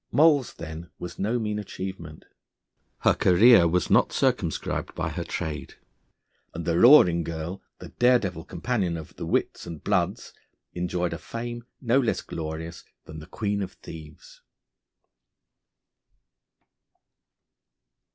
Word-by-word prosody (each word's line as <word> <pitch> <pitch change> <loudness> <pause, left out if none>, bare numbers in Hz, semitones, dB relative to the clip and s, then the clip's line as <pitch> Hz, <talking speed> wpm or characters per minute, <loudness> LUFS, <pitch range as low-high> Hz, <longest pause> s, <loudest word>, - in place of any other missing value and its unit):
Moll's 145 -1 +4
then 80 +1 -8
was 90 0 -8
no 110 +5 0
mean 105 -2 -2
achievement. 95 -5 -7 0.8
Her - - +4
career 100 +1 +6
was 90 +2 0
not - - +4
circumscribed - - -1
by - - -2
her - - -4
trade, 75 -4 -5 0.8
and 85 -1 -5
the 85 +1 +1
Roaring 90 - +7
Girl, 85 +3 -5 0.2
the - - -10
daredevil 110 -10 +1
companion 90 -3 -2
of 80 - -10
the - - -5
wits - - -1
and 80 -3 -8
bloods, - - -1 0.4
enjoyed 90 0 -2
a 85 - -6
fame 120 0 -6
no 125 +1 +2
less 120 -5 0
glorious 80 +1 -6 0.2
than 80 - -9
the 75 - -11
Queen 100 +1 -2
of 95 - -5
Thieves. 80 -2 -12
90 Hz, 120 wpm, -26 LUFS, 80-115 Hz, 0.8 s, Roaring